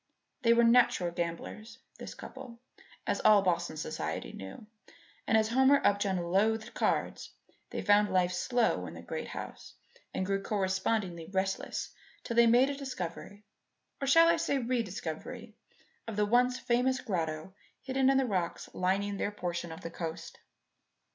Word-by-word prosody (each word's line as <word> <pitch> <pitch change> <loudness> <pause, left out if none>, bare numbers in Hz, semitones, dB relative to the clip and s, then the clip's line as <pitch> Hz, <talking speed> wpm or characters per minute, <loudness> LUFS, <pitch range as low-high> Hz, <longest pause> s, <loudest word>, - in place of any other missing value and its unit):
They 230 -2 +5
were 235 0 +4
natural 230 -7 +4
gamblers 175 +7 -5 0.2
this - - -8
couple 255 -3 -10 0.5
as - - -1
all 210 -2 +6
Boston 175 -3 0
society - - -4
knew; 95 - -9 0.6
and 220 - +4
as 220 0 +2
Homer 265 +4 +5
Upjohn 200 -2 +2
loathed 215 +6 0
cards, - - -1 0.4
they - - -4
found 205 0 +4
life 180 -1 +2
slow 200 - 0
in 80 - -9
the 85 - -10
great - - -5
house - - -8 0.4
and 190 - -2
grew 195 +1 -1
correspondingly 190 -3 -1
restless 190 0 -2 0.3
till 235 - -4
they 235 0 +6
made 250 +4 +5
a - - -4
discovery 205 -7 -6 0.6
or 275 - -1
shall 330 +4 +7
I 335 0 +4
say 305 - 0
a 270 - 0
rediscovery 230 -1 -4 0.5
of 225 - -5
the 210 0 +2
once 250 +3 +3
famous 255 +1 +1
grotto 165 -4 -3 0.3
hidden 265 0 +2
in 270 - +4
the 270 - +3
rocks 185 -7 -3
lining 200 +2 0
their - - -1
portion 175 -4 -4
of 160 +3 -9
the 165 - -6
coast. 165 -1 -6
205 Hz, 155 wpm, -31 LUFS, 180-240 Hz, 0.6 s, shall